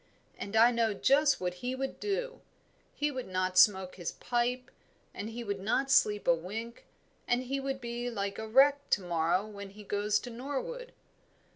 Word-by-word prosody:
And 200 Hz, -, -6 dB
I 230 Hz, +2 st, +7 dB
know 230 Hz, -3 st, +1 dB
just 280 Hz, +6 st, +3 dB
what 180 Hz, -1 st, -2 dB
he 250 Hz, +1 st, -2 dB
would 270 Hz, +1 st, -4 dB
do; 485 Hz, +5 st, -3 dB, 0.5 s
he 295 Hz, 0 st, 0 dB
would 255 Hz, -2 st, -5 dB
not 185 Hz, 0 st, -1 dB
smoke 190 Hz, 0 st, +4 dB
his 175 Hz, -3 st, -4 dB
pipe 245 Hz, +1 st, -1 dB, 0.4 s
and 210 Hz, -, -5 dB
he 235 Hz, +1 st, -6 dB
would 200 Hz, -3 st, -3 dB
not 265 Hz, +7 st, 0 dB
sleep 210 Hz, -4 st, +3 dB
a 170 Hz, -, +7 dB
wink, 215 Hz, +8 st, -6 dB, 0.4 s
and 245 Hz, +1 st, +1 dB
he 270 Hz, +2 st, -2 dB
would 270 Hz, 0 st, -3 dB
be 240 Hz, 0 st, -4 dB
like 200 Hz, -3 st, -3 dB
a 220 Hz, -, -5 dB
wreck 280 Hz, +5 st, +4 dB
to 205 Hz, -, +2 dB
morrow 175 Hz, +2 st, 0 dB
when 200 Hz, -2 st, -9 dB
he 210 Hz, +2 st, -12 dB
goes 205 Hz, +1 st, 0 dB
to 245 Hz, -, -8 dB
Norwood. 285 Hz, -, -5 dB
230 Hz, 180 wpm, -31 LUFS, 200-265 Hz, 0.5 s, I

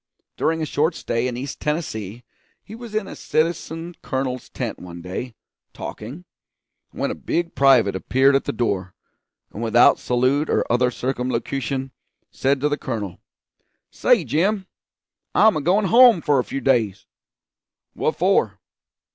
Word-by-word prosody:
During 160 Hz, 0 st, 0 dB
a -, -, 0 dB
short 155 Hz, +3 st, 0 dB
stay 115 Hz, +2 st, -1 dB
in 120 Hz, -1 st, -4 dB
East 135 Hz, +2 st, -6 dB
Tennessee 120 Hz, -, -3 dB, 0.4 s
he 210 Hz, -, -12 dB
was 230 Hz, -1 st, -9 dB
in 215 Hz, -2 st, -1 dB
a -, -, -8 dB
citizen 165 Hz, +1 st, -2 dB
colonel's 130 Hz, -2 st, -3 dB
tent -, -, -5 dB
one 85 Hz, -1 st, -9 dB
day, 95 Hz, +7 st, -6 dB, 0.4 s
talking, 135 Hz, +12 st, -8 dB, 0.6 s
when -, -, -3 dB
a -, -, -2 dB
big 170 Hz, 0 st, -2 dB
private 130 Hz, -8 st, +4 dB
appeared 135 Hz, +8 st, +3 dB
at 135 Hz, -, +1 dB
the -, -, -1 dB
door, 100 Hz, -6 st, -2 dB, 0.6 s
and 105 Hz, -, -6 dB
without 115 Hz, +1 st, +5 dB
salute 130 Hz, +5 st, +1 dB
or -, -, +1 dB
other 125 Hz, +1 st, +3 dB
circumlocution 130 Hz, +1 st, -3 dB, 0.4 s
said 135 Hz, +1 st, +1 dB
to 150 Hz, -, +2 dB
the 145 Hz, 0 st, -2 dB
colonel: 105 Hz, -8 st, -4 dB, 0.7 s
'Say, -, -, +3 dB
Jim, 190 Hz, +6 st, 0 dB, 0.7 s
I'm 220 Hz, 0 st, +5 dB
a 155 Hz, -, -1 dB
goin' 190 Hz, +7 st, +2 dB
home 235 Hz, -2 st, +6 dB
for 145 Hz, -3 st, +2 dB
a -, -, +1 dB
few 135 Hz, -, -5 dB
days.' 110 Hz, -7 st, +1 dB, 0.9 s
'What -, -, -1 dB
for?' -, -, +2 dB
135 Hz, 145 wpm, -22 LUFS, 120-160 Hz, 0.9 s, home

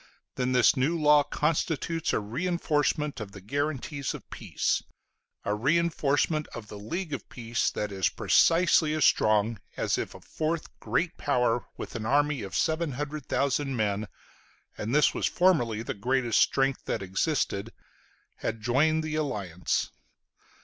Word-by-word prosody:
then 125 Hz, 0 st, -1 dB
this 125 Hz, +1 st, +5 dB
new 145 Hz, +6 st, +1 dB
law 150 Hz, -1 st, +6 dB
constitutes 160 Hz, +2 st, -1 dB
a -, -, +1 dB
reinforcement 150 Hz, -, -1 dB
of 100 Hz, -2 st, -7 dB
the 100 Hz, -, -9 dB
guarantees 140 Hz, +5 st, -3 dB
of -, -, -11 dB
peace, -, -, -1 dB, 0.6 s
a 105 Hz, -, +1 dB
reinforcement 150 Hz, +3 st, +1 dB
of 105 Hz, -3 st, -8 dB
the 105 Hz, -, -8 dB
league 160 Hz, -, -4 dB
of 140 Hz, -, -6 dB
peace, 120 Hz, -1 st, -1 dB
that 105 Hz, -1 st, -3 dB
is 95 Hz, -1 st, +1 dB
precisely 165 Hz, -2 st, +3 dB
as 155 Hz, -, +3 dB
strong 110 Hz, 0 st, +3 dB, 0.2 s
as -, -, 0 dB
if -, -, -5 dB
a -, -, -10 dB
fourth 160 Hz, +1 st, -3 dB
great 130 Hz, +11 st, -1 dB
power 125 Hz, -4 st, +1 dB
with -, -, -7 dB
an 110 Hz, -1 st, -3 dB
army 145 Hz, 0 st, +2 dB
of 95 Hz, -2 st, -6 dB
700,000 145 Hz, -3 st, -1 dB
men 105 Hz, -2 st, -1 dB, 0.7 s
and 115 Hz, +6 st, -2 dB
this 150 Hz, -, +4 dB
was -, -, 0 dB
formerly 120 Hz, -12 st, +2 dB
the -, -, -3 dB
greatest 120 Hz, +2 st, +1 dB
strength 135 Hz, 0 st, +2 dB
that -, -, -2 dB
existed 100 Hz, -, -1 dB, 0.7 s
had 115 Hz, -, -3 dB
joined 145 Hz, +8 st, +2 dB
the 155 Hz, -1 st, -4 dB
alliance. 100 Hz, -, -2 dB
135 Hz, 140 wpm, -28 LUFS, 110-155 Hz, 0.7 s, law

